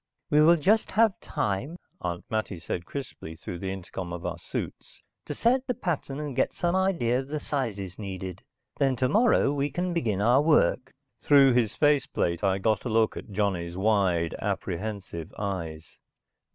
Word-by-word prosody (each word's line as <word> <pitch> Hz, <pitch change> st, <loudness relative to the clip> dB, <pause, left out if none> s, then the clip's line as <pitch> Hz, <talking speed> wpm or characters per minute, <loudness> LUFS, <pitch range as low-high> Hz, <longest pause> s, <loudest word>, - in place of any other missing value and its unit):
"We 150 Hz, -, +6 dB
will 165 Hz, +3 st, +7 dB
just 205 Hz, +7 st, +2 dB
have 220 Hz, -2 st, +3 dB
time," 105 Hz, -, -2 dB, 0.3 s
Aunt 90 Hz, -1 st, -4 dB
Mattie 110 Hz, -4 st, -2 dB
said 85 Hz, +1 st, -4 dB
crisply, 125 Hz, -, -7 dB
through 85 Hz, +2 st, -7 dB
the 95 Hz, +1 st, -3 dB
intercom 95 Hz, -1 st, -6 dB
of 85 Hz, 0 st, -6 dB
our -, -, -3 dB
suits, -, -, -6 dB, 0.3 s
"To -, -, -4 dB
set 255 Hz, +3 st, +2 dB
the 250 Hz, -, 0 dB
pattern 150 Hz, -7 st, -3 dB
and 145 Hz, -3 st, -4 dB
get -, -, +1 dB
some 175 Hz, +1 st, 0 dB
idea 170 Hz, -11 st, +2 dB
of 135 Hz, -, -5 dB
the 150 Hz, +1 st, -3 dB
sizes 105 Hz, -, -3 dB
needed. 95 Hz, -2 st, -6 dB, 0.4 s
Then 135 Hz, -2 st, +3 dB
tomorrow 145 Hz, -, +3 dB
we 145 Hz, 0 st, 0 dB
can 175 Hz, +5 st, -2 dB
begin 110 Hz, -, 0 dB
our 120 Hz, +6 st, +4 dB
work." 150 Hz, -4 st, +3 dB, 0.3 s
Through 140 Hz, -3 st, +6 dB
his 120 Hz, -4 st, +1 dB
face 145 Hz, -2 st, +3 dB
plate 85 Hz, +1 st, -1 dB
I 95 Hz, -1 st, +2 dB
got 105 Hz, +1 st, +1 dB
a 125 Hz, -, -3 dB
look 110 Hz, 0 st, +2 dB
at -, -, -8 dB
Johnny's 95 Hz, -4 st, -1 dB
wide, 95 Hz, -5 st, +2 dB
apprehensive 95 Hz, -3 st, -4 dB
eyes. 85 Hz, -6 st, -5 dB
110 Hz, 170 wpm, -27 LUFS, 95-145 Hz, 0.4 s, will